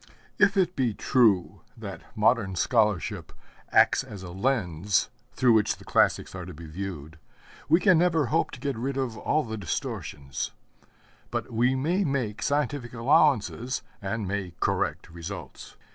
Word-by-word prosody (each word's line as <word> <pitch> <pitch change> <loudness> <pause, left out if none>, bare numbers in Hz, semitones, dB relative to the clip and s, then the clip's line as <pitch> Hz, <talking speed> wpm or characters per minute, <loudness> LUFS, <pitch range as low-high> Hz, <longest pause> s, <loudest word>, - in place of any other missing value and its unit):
If 200 0 +4
it 185 -1 +2
be 120 -6 0
true 110 -9 +2 0.2
that - - -7 0.2
modern 105 -3 +2
scholarship 105 -1 +1 0.4
acts - - +5
as 100 -3 -9
a 90 - -7
lens 95 - 0 0.2
through 125 -2 +4
which 110 -2 +2
the - - -15
classics - - +2
are 95 -1 -6
to 90 -2 -9
be 85 +2 -10
viewed, 80 -2 -7 0.5
we 165 +3 +6
can 185 -4 +5
never 165 -4 +3
hope 160 +8 +1
to - - -8
get 140 -3 -2
rid 135 +3 -2
of 130 -4 -2
all 155 +7 0
the 110 -2 -5
distortions; 70 -7 -4 0.8
but - - -4
we 125 +3 +2
may 170 +9 +1
make 125 - -2
scientific 145 -3 -1
allowances, 125 0 +2 0.2
and 105 +1 -3
may 95 -3 -3
correct - - -1
results. 85 +4 -8
115 Hz, 150 wpm, -27 LUFS, 95-140 Hz, 0.8 s, we